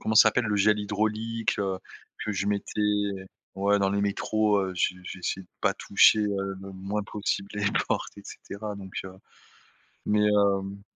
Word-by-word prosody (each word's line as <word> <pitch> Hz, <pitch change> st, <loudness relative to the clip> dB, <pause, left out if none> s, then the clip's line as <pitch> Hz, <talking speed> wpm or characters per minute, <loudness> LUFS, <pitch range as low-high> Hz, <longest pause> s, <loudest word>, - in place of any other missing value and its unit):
comment 110 Hz, -, -1 dB
ça 110 Hz, -, +9 dB
s'appelle, 120 Hz, +2 st, +1 dB
le 105 Hz, -2 st, 0 dB
gel 105 Hz, +1 st, +4 dB
hydraulique, 110 Hz, +2 st, -1 dB
heu, 95 Hz, -2 st, -1 dB, 0.4 s
que -, -, -2 dB
je 100 Hz, -1 st, -1 dB
mettais 105 Hz, -1 st, -1 dB, 0.3 s
ouais, 100 Hz, +1 st, +2 dB
dans 95 Hz, 0 st, +2 dB
les 100 Hz, -, +1 dB
métros, 105 Hz, +1 st, +1 dB
heu, 95 Hz, -1 st, -2 dB
j 90 Hz, -, +1 dB
j'essayais 95 Hz, +1 st, -4 dB
de 90 Hz, -, -21 dB
pas -, -, +2 dB
toucher, 105 Hz, +2 st, +5 dB
heu, 100 Hz, -2 st, -1 dB
le 95 Hz, 0 st, -8 dB
moins 100 Hz, +3 st, -3 dB
possible 100 Hz, -1 st, -2 dB
les 105 Hz, -1 st, -1 dB, 0.2 s
portes, -, -, -2 dB
et -, -, -10 dB
cetera 105 Hz, 0 st, -7 dB
donc, 95 Hz, -2 st, -9 dB
heu, 95 Hz, -, -8 dB, 1.0 s
mais, 105 Hz, 0 st, +3 dB
hem 100 Hz, -1 st, +2 dB
100 Hz, 175 wpm, -27 LUFS, 95-105 Hz, 1.0 s, ça